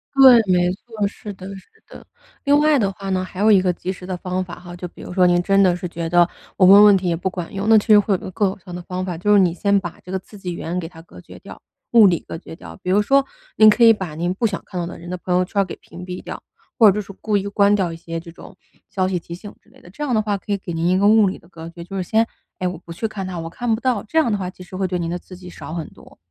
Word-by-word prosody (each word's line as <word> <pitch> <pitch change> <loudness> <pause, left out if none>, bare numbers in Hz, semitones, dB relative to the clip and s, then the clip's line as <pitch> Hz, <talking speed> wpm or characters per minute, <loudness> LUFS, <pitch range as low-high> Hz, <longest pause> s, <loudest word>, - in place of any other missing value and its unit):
对， 265 -3 +9
没 180 0 +3
错， 215 0 -4
是 205 +1 -9
的 185 0 -10
是 190 - -13 0.2
的。 - - -13 0.4
另 285 0 +4
外 300 0 +4
的 200 -6 +1
话 195 0 -8
呢， 185 -1 0
还 185 0 -9
有 215 +2 +4
一 195 -3 +6
个 185 - +1
及 180 +1 -5
时 180 - -11
的 185 -1 -4
方 185 +1 -3
法 175 -1 -10
哈， 175 0 -10
就 180 0 -7
比 - - -15
如 - - -8
说 180 -1 +4
您 175 0 +3
真 195 +2 +3
的 180 -2 +4
是 180 0 -5
觉 165 -1 -5
得， 175 0 +4 0.3
我 185 - +5
问 200 +2 +9
问 205 -2 +7
题 185 - -3
也 170 - +1
不 180 +3 -2
管 180 -3 -7
用。 200 +2 -2
那 225 - +7
其 210 - 0
实 210 -1 +7
会 205 0 0
有 190 - +2
一 - - -20
个 - - -6
更 200 +1 +1
有 - - -7
效 180 -2 -10
的 175 - -6
方 185 +1 -5
法， 175 -3 -4
就 205 +4 0
是 205 - +6
你 180 -3 +3
先 200 +3 +1
把 175 -3 -8
这 180 - -10
个 190 - -1
刺 205 +3 -15
激 180 -2 -5
源， 170 +1 -4
给 165 - -5
它 165 -2 -14
隔 165 - -15
绝 - - -14
掉 - - -12 0.3
物 230 -3 +7
理 175 -3 +2
隔 - - -6
绝 165 - -12
掉。 - - -11
比 180 - -1
如 205 - +4
说， 275 +5 +3 0.3
您 215 0 +7
可 235 +3 +3
以 225 - +8
把 190 -7 -6
您 175 +3 -1
不 215 +5 -2
想 205 -3 -1
看 180 - -6
到 170 - -2
的 175 - -8
人 175 - -10
的 180 - -4
朋 180 +1 -3
友 180 - +2
圈 200 +2 0
儿 - - 0
给 180 - -8
屏 175 +2 -12
蔽 180 0 -6
掉， - - -8 0.4
或 215 -4 +7
者 - - -4
就 210 - -1
是 200 0 -11
故 210 -2 +1
意 200 +1 -3
关 200 0 +3
掉 185 -5 0
一 - - -7
些 165 0 -6
这 170 +1 -12
种， 175 - -14 0.3
消 185 -1 -1
息 185 -1 -1
提 170 0 -8
醒 200 +4 -9
之 - - -28
类 - - -21
的， - - -15
这 210 +11 -7
样 275 -4 -1
的 215 - +3
话 210 -2 -1
可 205 - -8
以 200 - +1
给 180 -3 -7
您 165 +1 -1
一 185 +1 +3
个 200 - +4
物 215 -1 +5
理 185 - -4
的 170 - -22
隔 165 -2 -10
绝。 170 0 -10
就 195 - -9
是 190 - -1
先 220 +5 +1 0.3
诶， 185 - -1
我 180 - -4
不 170 - -13
去 225 +7 -3
看 205 -3 -6
它， 180 -2 -5
我 165 0 -6
看 235 +5 -2
不 220 - -1
到， 250 -6 0
这 320 +9 0
样 305 -7 +2
的 205 - 0
话 180 -2 -4
其 185 - -15
实 180 +1 -10
会 190 0 -1
对 180 0 -2
您 165 - -3
的 175 - -2
刺 180 0 -13
激 180 -1 -11
少 165 - -9
很 165 -2 -4
多。 - - -18
185 Hz, 360 characters per minute, -20 LUFS, 175-205 Hz, 0.4 s, 对